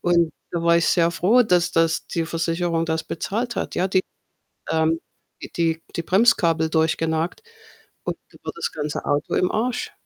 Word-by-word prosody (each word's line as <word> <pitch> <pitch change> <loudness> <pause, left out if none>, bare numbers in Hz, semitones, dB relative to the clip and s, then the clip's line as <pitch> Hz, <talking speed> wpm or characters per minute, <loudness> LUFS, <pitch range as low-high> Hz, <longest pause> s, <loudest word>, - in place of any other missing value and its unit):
Und 170 -2 +2 0.2
da 170 -1 -2
war 170 0 +5
ich 170 - +1
sehr 170 -1 +3
froh, 215 +9 +4
dass 180 -4 +2
das 165 -1 +1
die 165 -1 -2
Versicherung 165 0 -1
das 160 0 -1
bezahlt 235 +8 -3
hat, - - -3
ja. 185 +2 +1
Die, 190 0 +3 0.7
ähm, 160 0 +2 0.6
die 165 -1 0
die 170 - -2
Bremskabel 170 -6 +3
durchgenagt 160 +1 0 0.6
und - - -3
da - - -18
war - - -4
das - - -3
ganze 150 -1 -4
Auto 145 0 0
im 180 - +2
Arsch. 245 +3 -1
170 Hz, 165 wpm, -23 LUFS, 160-180 Hz, 0.7 s, war